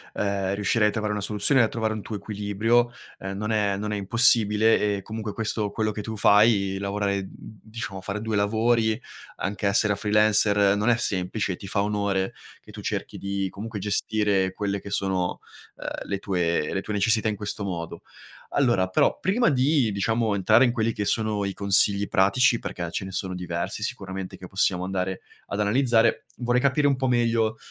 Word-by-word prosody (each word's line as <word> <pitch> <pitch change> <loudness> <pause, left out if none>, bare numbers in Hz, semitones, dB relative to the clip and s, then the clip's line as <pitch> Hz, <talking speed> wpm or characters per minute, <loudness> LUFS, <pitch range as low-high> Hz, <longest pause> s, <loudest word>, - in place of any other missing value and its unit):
ehm, 100 -1 -1
riuscirai 105 +2 +2
a - - -2
trovare 105 -1 -2
una 105 - -3
soluzione 105 +7 +3
e - - +5
a 110 - +3
trovare 110 -1 -2
un 110 - -5
tuo 110 - -6
equilibrio. 110 +4 0 0.3
Ehm, 95 +1 -5
non 105 +1 -3
è 105 -2 +1
non 105 +1 -4
è - - -1
impossibile 105 0 +3
e 100 - -6
comunque 110 0 -6
questo 110 -1 -2
quello 110 0 -1
che 105 0 -5
tu 110 +1 -6
fai, 100 -2 +4
lavorare, 100 0 -1
diciamo, 110 -2 -9
fare 100 +2 -4
2 110 -1 -2
lavori, 110 +2 +1 0.4
anche 100 +1 -2
essere 100 0 +2
freelancer, 105 -1 +3
non 105 +3 +1
è 120 - +4
semplice 95 -2 -2
e - - -5
ti 100 - -9
fa 100 +1 0
onore 100 -2 -1 0.3
che - - -16
tu - - -9
cerchi - - -4
di 100 0 -2
comunque 105 +2 -7
gestire 100 -1 0
quelle 100 -1 -3
che 100 - -9
sono, 95 -3 -1 0.4
ehm, - - -6
le 100 - -1
tue 85 -5 -1
le 95 - -1
tue 105 - -5
necessità 110 +2 +2
in 105 - -2
questo 105 0 -5
modo. 85 -4 -5 0.5
Allora, 120 -9 +2
però, 95 - +2
prima 230 +6 +2
di, 135 -3 +2
diciamo, 110 +2 0
entrare 110 +5 +4
in 125 - +3
quelli 115 -1 0
che 105 - -3
sono 110 -1 0
i 100 0 -2
consigli 100 0 +3
pratici- 120 +7 +3
perché 85 -1 -5
ce - - -3
ne 95 - -7
sono 95 0 -3
diversi 85 -1 -4
sicuramente 95 -1 -5
che 90 - -10
possiamo 95 -1 0
andare 95 0 -3 0.3
ad 100 - -4
analizzare- 115 +2 +2
vorrei 120 0 +1
capire 140 +2 +2
un 140 - +3
po' 130 0 -1
meglio, 115 -2 +1
105 Hz, 190 wpm, -25 LUFS, 100-110 Hz, 0.5 s, e